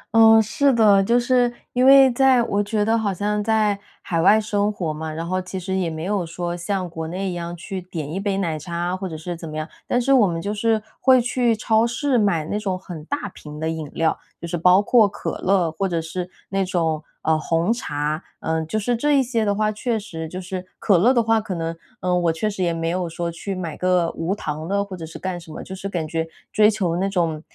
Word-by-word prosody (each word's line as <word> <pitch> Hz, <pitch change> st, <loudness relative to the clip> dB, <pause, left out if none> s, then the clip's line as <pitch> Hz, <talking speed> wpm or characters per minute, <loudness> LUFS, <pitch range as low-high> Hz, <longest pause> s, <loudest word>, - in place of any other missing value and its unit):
嗯， 225 Hz, 0 st, +8 dB
是 280 Hz, +6 st, +2 dB
的。 210 Hz, -5 st, +5 dB
就 235 Hz, +4 st, +3 dB
是 245 Hz, 0 st, +2 dB, 0.2 s
因 250 Hz, +1 st, +3 dB
为 270 Hz, -1 st, +8 dB
在 255 Hz, -1 st, +4 dB
我 205 Hz, -2 st, 0 dB
觉 205 Hz, 0 st, 0 dB
得 225 Hz, +1 st, +2 dB
好 220 Hz, -3 st, 0 dB
像 205 Hz, +2 st, -1 dB
在 215 Hz, -2 st, +2 dB, 0.2 s
海 165 Hz, -2 st, 0 dB
外 205 Hz, +5 st, +6 dB
生 210 Hz, -1 st, 0 dB
活 170 Hz, -7 st, -3 dB
嘛， 160 Hz, +1 st, -5 dB
然 165 Hz, +2 st, -5 dB
后 185 Hz, +1 st, -1 dB
其 185 Hz, +1 st, -6 dB
实 190 Hz, +1 st, -3 dB
也 185 Hz, -3 st, 0 dB
没 160 Hz, 0 st, -5 dB
有 200 Hz, 0 st, 0 dB
说 175 Hz, +1 st, -4 dB
像 185 Hz, +1 st, -2 dB
国 160 Hz, -1 st, -6 dB
内 185 Hz, +3 st, -3 dB
一 -, -, -4 dB
样 170 Hz, 0 st, -5 dB
去 185 Hz, +2 st, -6 dB
点 160 Hz, -4 st, -6 dB
一 190 Hz, -, -2 dB
杯 195 Hz, -1 st, -1 dB
奶 165 Hz, -5 st, -1 dB
茶 170 Hz, +3 st, -7 dB
啊， 175 Hz, +1 st, -1 dB
或 185 Hz, -1 st, -5 dB
者 160 Hz, -, -6 dB
是 175 Hz, +3 st, -5 dB
怎 165 Hz, -1 st, -8 dB
么 155 Hz, -, -6 dB
样。 155 Hz, 0 st, -3 dB, 0.2 s
但 245 Hz, -, +2 dB
是 270 Hz, +3 st, +2 dB
我 240 Hz, -6 st, +6 dB
们 170 Hz, -2 st, -2 dB
就 200 Hz, +5 st, -3 dB
是 220 Hz, +1 st, +1 dB, 0.2 s
会 260 Hz, -1 st, +6 dB
去 245 Hz, -1 st, +1 dB
超 220 Hz, +1 st, +2 dB
市 255 Hz, +1 st, +1 dB
买 185 Hz, -7 st, +1 dB
那 205 Hz, +6 st, -2 dB
种 190 Hz, -3 st, -2 dB
很 175 Hz, -4 st, -9 dB
大 285 Hz, -, -3 dB
瓶 150 Hz, 0 st, -10 dB
的 160 Hz, -, -2 dB
饮 160 Hz, -2 st, -5 dB
料， 165 Hz, -1 st, +1 dB, 0.2 s
就 170 Hz, -, -6 dB
是 170 Hz, -, -3 dB
包 180 Hz, +4 st, +5 dB
括 225 Hz, 0 st, +5 dB
可 -, -, -5 dB
乐， 185 Hz, -3 st, +2 dB
或 190 Hz, +5 st, -2 dB
者 170 Hz, -2 st, 0 dB
是 175 Hz, +2 st, -5 dB, 0.2 s
那 195 Hz, 0 st, 0 dB
种， 165 Hz, -4 st, -1 dB, 0.2 s
呃， 160 Hz, 0 st, +2 dB
红 165 Hz, +6 st, +1 dB
茶。 150 Hz, -8 st, -2 dB, 0.2 s
嗯， 160 Hz, 0 st, -1 dB
就 215 Hz, -, -2 dB
是 240 Hz, +3 st, 0 dB
这 290 Hz, +5 st, +2 dB
一 270 Hz, -, +4 dB
些 235 Hz, -3 st, 0 dB
的 205 Hz, -1 st, +1 dB
话， 215 Hz, +1 st, +1 dB
确 225 Hz, +2 st, -1 dB
实， 170 Hz, -7 st, -6 dB
就 180 Hz, +3 st, -6 dB
是 185 Hz, 0 st, -5 dB
可 195 Hz, -4 st, +3 dB
乐 230 Hz, +8 st, +5 dB
的 240 Hz, -3 st, +3 dB
话， 225 Hz, 0 st, +2 dB
可 195 Hz, -3 st, -5 dB
能， 165 Hz, 0 st, -3 dB, 0.3 s
呃， 180 Hz, 0 st, 0 dB
我 170 Hz, -2 st, +2 dB
确 165 Hz, +7 st, -2 dB
实 200 Hz, -2 st, -3 dB
也 175 Hz, -2 st, +2 dB
没 165 Hz, 0 st, -2 dB
有 175 Hz, 0 st, -1 dB
说 170 Hz, 0 st, -3 dB
去 195 Hz, +4 st, -5 dB
买 175 Hz, -4 st, -4 dB
个 180 Hz, -2 st, +2 dB
无 175 Hz, +4 st, -2 dB
糖 155 Hz, -4 st, -5 dB
的， 200 Hz, +2 st, +1 dB
或 195 Hz, -2 st, -7 dB
者 165 Hz, -3 st, -7 dB
是 160 Hz, -, -9 dB
干 185 Hz, -2 st, -4 dB
什 165 Hz, -2 st, -13 dB
么。 -, -, -7 dB
就 190 Hz, -, -8 dB
是 190 Hz, +1 st, -5 dB
感 170 Hz, -5 st, -2 dB
觉 165 Hz, +1 st, -2 dB, 0.2 s
追 210 Hz, 0 st, +5 dB
求 185 Hz, -6 st, -1 dB
那 190 Hz, +2 st, 0 dB
种， 165 Hz, -5 st, -1 dB
185 Hz, 270 characters per minute, -22 LUFS, 165-215 Hz, 0.3 s, 嗯